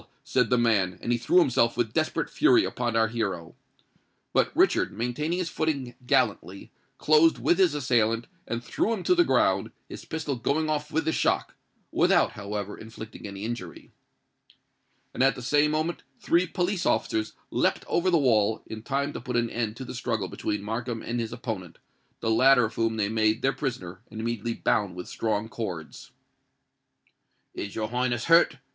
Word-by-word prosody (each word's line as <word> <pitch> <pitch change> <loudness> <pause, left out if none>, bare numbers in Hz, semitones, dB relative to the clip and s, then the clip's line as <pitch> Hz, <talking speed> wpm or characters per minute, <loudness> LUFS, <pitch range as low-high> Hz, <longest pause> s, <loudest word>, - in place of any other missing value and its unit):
said 125 -3 +1
the 125 - +3
man; 105 -6 +2
and 120 - -1
he 120 - +2
threw 120 - +2
himself 125 -8 +3
with 115 -2 0
desperate 155 0 0
fury 335 +3 +4
upon 120 -2 -2
our 115 0 +4
hero. 95 -8 -3 0.8
But - - +3
Richard, - - +3
maintaining 125 - -2
his 175 -4 -2
footing 140 -6 -2
gallantly, 95 -4 0 0.3
closed 155 +2 +4
with 175 - +2
his 180 -6 +4
assailant, 115 -4 +1 0.2
and 115 +1 -3
threw 120 - -1
him 200 -5 -4
to - - +4
the 350 -1 +5
ground, - - +2 0.2
his - - -9
pistol 155 -3 -3
going 155 +6 0
off 150 0 -2
with 160 0 0
the 160 - +2
shock—without, - - 0
however, 105 0 -5
inflicting 110 -1 -10
any 100 0 -7
injury. 120 +1 -7 1.2
And - - -3
at 135 +1 +4
the 125 - -8
same 145 +4 +3
moment 155 +3 -1 0.2
three 175 +2 +2
police 180 +1 -1
officers 110 0 0 0.2
leapt - - 0
over 180 +2 +1
the 175 - +4
wall, 110 -6 +2
in 110 0 -7
time 140 +4 -2
to - - -6
put 125 - -4
an 120 -1 +1
end 115 -2 -2
to 130 - -6
the - - -7
struggle 115 -5 -2
between 105 -1 -3
Markham 115 +2 -4
and 120 +1 -3
his 115 -1 -3
opponent, 95 -9 -6 0.4
the 115 - 0
latter 125 +1 +5
of 110 - -5
whom 115 0 0
they 105 -2 +1
made 110 +1 +1
their 135 +1 +2
prisoner 95 -10 -4
and 110 - -8
immediately 115 0 -2
bound 100 -4 0
with 90 -1 -7
strong 110 -1 -2
cords. 95 -9 -6 1.4
"Is 100 - -6
your 110 -1 -2
Highness 120 -1 -1
hurt?" 165 -4 +5
120 Hz, 175 wpm, -27 LUFS, 110-145 Hz, 1.4 s, the